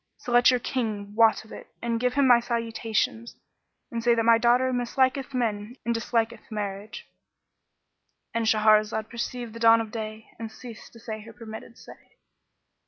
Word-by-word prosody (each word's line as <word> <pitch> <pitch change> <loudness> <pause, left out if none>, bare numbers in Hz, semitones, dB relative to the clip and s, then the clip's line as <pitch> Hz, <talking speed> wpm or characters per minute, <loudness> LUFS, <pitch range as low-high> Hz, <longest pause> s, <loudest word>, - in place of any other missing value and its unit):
So 245 - -7
let 240 0 +6
your 250 -1 +3
King 215 -5 -3
wot 220 0 +4
of 220 - -17
it - - -10
and 230 -1 -2
give 250 +1 0
him 280 -1 +4
my 245 -2 +7
salutations 230 -1 -2 0.6
and 230 -1 -3
say 240 0 +4
that 230 - +1
my 230 0 +5
daughter 250 +2 +3
misliketh 260 +2 0
men 220 -1 -2
and 235 - +1
disliketh 230 0 -2
marriage."—And 210 +2 -8
Shahrazad 215 0 +3
perceived 235 -1 -5
the 230 - -8
dawn 230 0 +6
of 225 -2 -4
day 220 -1 -7
and 225 -1 -6
ceased 235 0 -11
to 230 - -14
say 220 -1 -6
her 225 +1 -12
permitted 225 0 -10
say. - - -16
230 Hz, 165 wpm, -26 LUFS, 220-240 Hz, 0.6 s, my